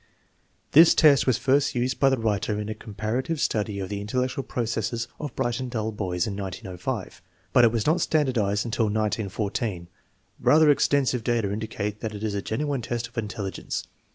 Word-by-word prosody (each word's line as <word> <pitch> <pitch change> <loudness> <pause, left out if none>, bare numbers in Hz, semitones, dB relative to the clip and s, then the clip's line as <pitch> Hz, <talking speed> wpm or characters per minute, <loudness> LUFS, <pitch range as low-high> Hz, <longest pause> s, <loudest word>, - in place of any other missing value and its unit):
This 160 +3 +8
test 145 -5 +5
was 125 -3 +3
first 135 +3 +2
used 125 +2 -1
by 135 - +5
the 135 - +1
writer 105 -2 -1
in 105 0 -4
a - - -2
comparative 110 +8 -3
study 105 -4 -1
of 95 - -4
the 100 -1 -3
intellectual 125 +5 -2
processes 115 -1 -2
of 145 -5 -6
bright 120 -1 -1
and 130 -1 -4
dull 110 -2 -2
boys 90 -4 -2
in 100 - -4
1905, 95 -2 -5 0.3
but 125 - +6
it 115 - +6
was 115 -2 -1
not 165 +3 +2
standardized 120 -11 +1
until 115 -1 0
1914. 105 -3 -2 0.5
Bather 155 0 +5
extensive 135 -4 +2
data 115 -4 0
indicate 105 -1 -4
that 110 -1 -4
it 105 - -7
is 110 -2 -1
a 100 - -2
genuine 140 +5 -2
test 115 0 -3
of 115 - -29
intelligence. 105 -3 -4
110 Hz, 180 wpm, -25 LUFS, 105-130 Hz, 0.5 s, This